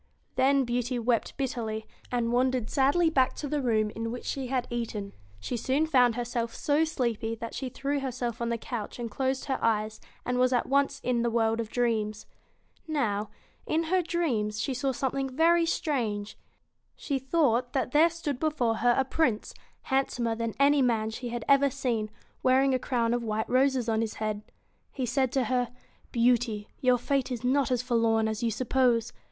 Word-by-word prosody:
Then 275 +1 +4
Beauty 245 +1 -1
wept 235 -1 0
bitterly, 230 -5 -3 0.3
and 235 -1 0
wandered 250 -2 +1
sadly 305 +5 +3
back 260 -4 +2
to 295 - -4
the 290 +1 -1
room 215 -4 +1
in 225 +1 -4
which 245 - -6
she 270 -2 -3
had 255 -1 -1
eaten. 220 -4 -4 0.3
She 100 - -4
soon 265 +6 +1
found 250 -7 +4
herself 240 -1 -3
so 295 +2 +2
sleepy 235 -7 -2
that 230 0 -7
she 265 - -4
threw 280 +3 -2
her 270 -1 -3
self 240 -2 -4
on 235 - 0
the 235 - 0
couch 225 -2 -5
and 235 -2 -5
closed 265 +3 -1
her 270 - -1
eyes, 215 -1 0 0.2
and 250 0 0
was 255 0 +3
at 245 - +2
once 280 0 +1
in 245 -2 +1
the 235 - +1
world 225 -1 +1
of 225 -2 -3
dreams. 220 -3 -1 0.6
Now, 215 -9 -1 0.4
in 325 +2 0
her 370 - +4
dreams, 245 -12 -1
she 265 +5 -1
saw 265 +2 0
something 270 +1 -2
very 330 +5 +3
strange. 220 -11 -1 0.6
She 275 -3 -2
thought 255 -3 +1
that 260 -3 -1
there 315 +4 +5
stood 310 -6 -4
before 265 -8 0
her 240 0 +3
a 265 - +2
Prince, 255 -6 0 0.3
handsomer 250 -3 0
than 230 -1 -3
any 280 0 +5
man 225 -3 +1
she 245 +2 -5
had 235 -1 -4
ever 280 0 +5
BEAUTY 275 - -4
seen, 230 -6 -1 0.3
wearing: 265 +1 +4
a 255 - +2
crown 240 -2 0
of 240 0 -1
white 220 -1 -2
roses 260 -1 +2
on 220 -1 +1
his 220 -1 -3
head. 215 -1 -2
BEAST - - -31 0.4
He 260 - -2
said 260 +1 +1
to 265 - +2
her: 245 +1 0 0.4
<Beaut 240 0 +3
y' 210 -2 -5 0.2
y 255 - +3
ur 250 - +4
fate 270 +1 -1
is 245 -1 -4
not 270 +2 +2
as 250 -1 0
forlorn 230 -3 +2
as 220 +1 -3
you 235 - +1
suppose. 240 0 +1
245 Hz, 195 wpm, -28 LUFS, 230-270 Hz, 0.6 s, there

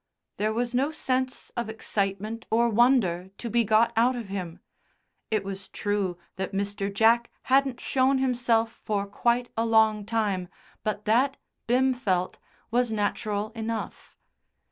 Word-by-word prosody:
There 215 +1 +1
was 240 +2 -1
no 265 +4 +2
sense 260 -4 -2
of 235 -2 -3
excitement 215 +1 -3
or 235 +1 +3
wonder 215 -7 +3
to 235 - -5
be 235 0 +3
got 220 +2 +3
out 240 +3 +3
of 230 -5 -6
him. 180 -4 -5 0.7
It 215 -3 0
was 195 0 -7
true 205 -4 -1 0.2
that 190 0 -3
Mr. 200 0 -2
Jack 230 +3 +4
hadn't 270 -2 +2
shown 265 +1 +2
himself 240 -3 +1
for 205 -2 -1
quite 235 +4 0
a 225 - +1
long 220 -2 +3
time, 210 -5 0 0.4
but 210 -1 -2
that, 255 +6 +3 0.3
Bim 260 +2 +3
felt, 185 -8 -1 0.3
was 240 0 +2
natural 210 0 -1
enough. 225 0 -5
225 Hz, 145 wpm, -27 LUFS, 205-245 Hz, 0.7 s, Jack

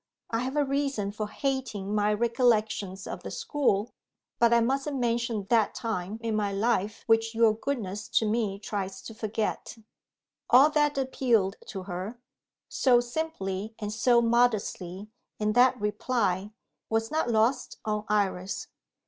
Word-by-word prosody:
I 225 - +1
have 260 +3 -3
a 295 -1 +2
reason 275 -7 -1
for 215 0 -4
hating 250 -7 -2
my 210 0 +2
recollections 215 -4 +1
of - - -6
the - - -6
school 245 -7 0 0.5
but 235 -1 +5
I 235 - +6
mustn't 270 +4 0
mention 235 -3 0
that 225 -3 +3
time 210 -2 -3
in 225 -1 -1
my 205 -2 0
life 205 0 0
which 225 0 +2
your 225 -1 +5
goodness 215 -4 -4
to 225 - +4
me 210 -3 0
tries 195 -2 -5
to 225 - -8
forget." 220 +1 -3 0.7
All 270 +5 +7
that 295 -1 +2
appealed 240 -7 +1
to 190 - -6
her, 190 +6 -6 0.5
so 245 -2 +4
simply 225 -7 -3
and 210 -1 -4
so 235 +1 +4
modestly, 215 -5 0 0.3
in 215 0 0
that 250 +1 +5
reply, 210 -2 0 0.4
was 225 0 0
not 310 -5 0
lost 235 +3 +1
on 210 -1 -1
Iris. 200 -2 -1
225 Hz, 145 wpm, -28 LUFS, 205-245 Hz, 0.7 s, All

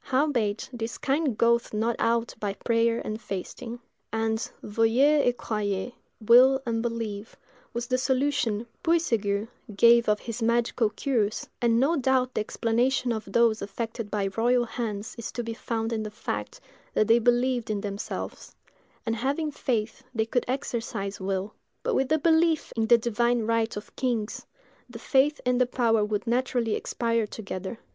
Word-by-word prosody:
Howbeit, 255 -7 0
this 230 -1 -4
kind 275 -4 0
goeth 235 -1 +2
not 225 +2 +1
out 230 0 +1
but 205 -2 -3
by - - -25
prayer 230 0 +2
and 215 +1 -4
fasting." 230 +5 -6 0.3
And, 225 0 0 0.2
veuillez 245 +8 +3
et 245 0 +1
croyez—will 235 +4 +2
and 230 -1 -1
believe—was 230 +1 -6
the 255 +1 0
solution 255 -5 0 0.2
Puységur 225 -11 +1 0.3
gave 235 +2 +6
of 210 0 +2
his 230 0 -6
magical 235 0 +2
cures; 220 -4 -1
and 235 -1 +3
no 305 +6 +3
doubt 255 -1 +1
the - - 0
explanation 240 +4 0
of 220 -2 -3
those 230 0 +3
affected 225 +2 -4
by 200 -2 -1
royal 240 +2 +3
hands 220 -3 -4
is 230 - -5
to 240 - -3
be 230 0 -4
found 225 0 -3
in 220 - -1
the 215 - -4
fact 210 - -5 0.4
that 215 - +4
they 230 +1 +6
believed 245 0 +1
in 210 -2 -1
themselves; 200 0 -6 0.5
and 225 -1 0
having 285 +6 -1
faith, 230 -6 -2
they 220 -1 +1
could 240 +2 0
exercise 230 -6 -3
will. 195 +2 -2 0.3
But, - - 0
with 265 -6 +1
the 315 - +4
belief 320 0 +2
in 225 -1 +1
the 235 +1 +7
divine 235 +1 +1
right 230 -1 0
of 205 - -9
kings, 235 -5 -2 0.4
the 240 - -8
faith 280 +4 +2
and 250 0 +2
the 250 - +4
power 230 -3 +2
would 210 0 -2
naturally 240 -2 0
expire 230 -2 -1
together. 195 0 -6
230 Hz, 160 wpm, -27 LUFS, 220-250 Hz, 0.5 s, the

